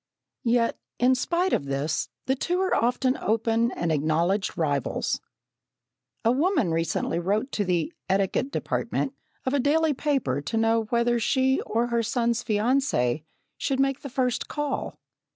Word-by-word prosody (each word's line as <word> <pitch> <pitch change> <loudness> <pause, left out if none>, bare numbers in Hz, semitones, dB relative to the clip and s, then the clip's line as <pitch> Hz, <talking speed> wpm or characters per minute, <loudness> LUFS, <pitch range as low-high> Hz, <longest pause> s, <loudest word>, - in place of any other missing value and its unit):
Yet, 230 0 +2 0.2
in 250 +2 +4
spite 345 +8 0
of - - +1
this, 140 +3 -1 0.2
the 265 - +2
two 350 +7 -1
are 380 0 +1
often 250 +2 +2
open 225 +2 +1
and 170 -7 -1
acknowledged 160 +6 +1
rivals. 145 -5 -1 1.0
A 230 - +5
woman 290 - +2
recently 165 0 0
wrote 210 +9 0
to 205 - 0
the 175 -3 0 0.2
"etiquette 195 +7 +1
department" 275 -1 -2 0.3
of 260 - 0
a 285 - +3
daily 305 +3 +3
paper 260 - 0
to 225 - -3
know 225 0 +2
whether 235 +1 +1
she 260 +3 +2
or 230 +2 +1
her 235 -1 +1
son's 235 +1 0
fiancée 210 - +1 0.3
should 270 -2 0
make 275 0 +2
the 280 - -6
first 250 -1 -1
call. 295 -1 -3
235 Hz, 150 wpm, -26 LUFS, 190-265 Hz, 1.0 s, A